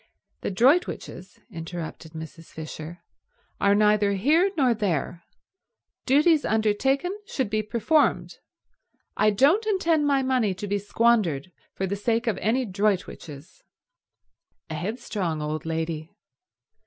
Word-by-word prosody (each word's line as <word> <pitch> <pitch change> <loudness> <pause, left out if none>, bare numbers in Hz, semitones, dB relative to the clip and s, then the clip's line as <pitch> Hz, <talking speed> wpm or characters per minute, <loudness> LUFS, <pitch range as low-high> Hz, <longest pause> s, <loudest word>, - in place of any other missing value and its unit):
"The - - -2
Droitwiches," 260 - +1
interrupted 165 -2 -7
Mrs. 160 +1 -9
Fisher, 160 +2 -9 0.6
"are 200 0 +4
neither 210 -1 +3
here 305 - +3
nor 255 -5 +4
there. 175 - -2 0.9
Duties 300 +3 +4
undertaken 260 - +1
should 260 - -2
be 215 0 +1
performed. 235 +8 +1 0.8
I 215 - +3
don't 295 - +3
intend 330 -7 +2
my 275 -2 +2
money 250 -7 +1
to 200 - -6
be 205 0 -1
squandered 205 -7 +1 0.2
for 190 - -2
the 195 +1 -2
sake 225 +3 0
of 225 -4 -1
any 245 +5 +1
Droitwiches." 185 -6 -3 1.1
A - - -3
headstrong 185 -2 -3
old 150 +1 -4
lady. 160 -1 -3
210 Hz, 115 wpm, -25 LUFS, 170-260 Hz, 1.1 s, are